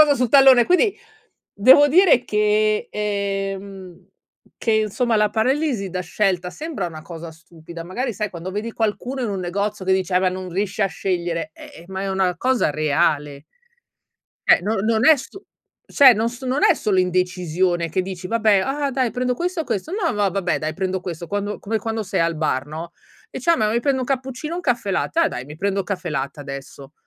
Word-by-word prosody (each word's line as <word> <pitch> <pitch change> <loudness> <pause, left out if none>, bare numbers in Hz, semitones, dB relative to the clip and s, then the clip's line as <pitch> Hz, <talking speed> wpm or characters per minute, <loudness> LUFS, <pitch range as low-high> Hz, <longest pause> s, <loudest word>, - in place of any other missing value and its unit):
cosa 300 -2 +6
sul 250 -2 +1
tallone, 265 -2 +7
quindi 385 +3 +3 0.6
devo 260 +8 +7
dire 320 -5 +5
che, 210 0 +1
ehm 195 -3 -4 0.5
che - - -1
insomma, 220 +2 +1
la 210 0 +3
paralisi 235 -1 0
da 180 +1 -3
scelta 180 0 -1
sembra 300 - -5
una 155 -2 -8
cosa 165 0 -9
stupida. 165 0 -12
Magari 235 +7 -3
sai 210 +1 -3
quando 175 +1 -7
vedi 210 +4 -4
qualcuno 235 +5 -2
in 240 - -1
un 195 -2 -3
negozio 200 +3 -3
che 190 - +2
dice: 190 -1 0
"Ah 180 - +4
beh 185 -1 +2
non 185 0 -6
riesci 200 +3 -3
a - - +4
scegliere!", 175 -4 -3
eh 160 - -13
eh - - -16
ma 190 0 -5
è 195 - -3
una 190 -2 0
cosa 255 -7 +1
reale. 145 -1 0 1.0
Cioè - - +6
non 210 +1 -1
non 225 +1 +2
è 315 - +8
su 385 +9 -10 0.4
cioè 270 -3 +7
non 225 +1 0
so 245 +2 -9
non 260 +3 0
è - - +6
solo 200 -4 +1
indecisione 180 -1 0
che 185 - 0
dici: 185 -1 -6
"Vabbè, 220 -2 +3
ah 275 +6 -1
dai, 255 -3 0
prendo 250 0 -1
questo 350 +5 -2
o - - -6
questo?", 230 - -3
"No 390 -2 -1
no, - - -5
ma 205 -1 +2
vabbè, 185 -2 -1
dai, 155 0 -3
prendo 190 +2 -2
questo". 170 -2 -6
Quando 205 +2 -3
come 220 +2 -2
quando 225 +1 -3
sei 190 - -2
al 165 0 0
bar, 140 -3 -1
no, 160 +3 -7 0.4
dice: 265 - -3
"Ah, 335 - +3
ma 215 0 +1
mi 235 - +1
prendo 265 +2 0
un - - -2
cappuccino 265 +4 -3
o - - -3
un - - -4
caffè 240 - -1
latte? 325 - -1
Ah, 335 - +4
dai, 125 - -6
mi 150 +2 -10
prendo 200 +2 -1
un 195 - -2
caffè 185 -3 -4
latte, 140 -1 -4
adesso". 140 0 -9
200 Hz, 210 wpm, -21 LUFS, 180-245 Hz, 1.0 s, è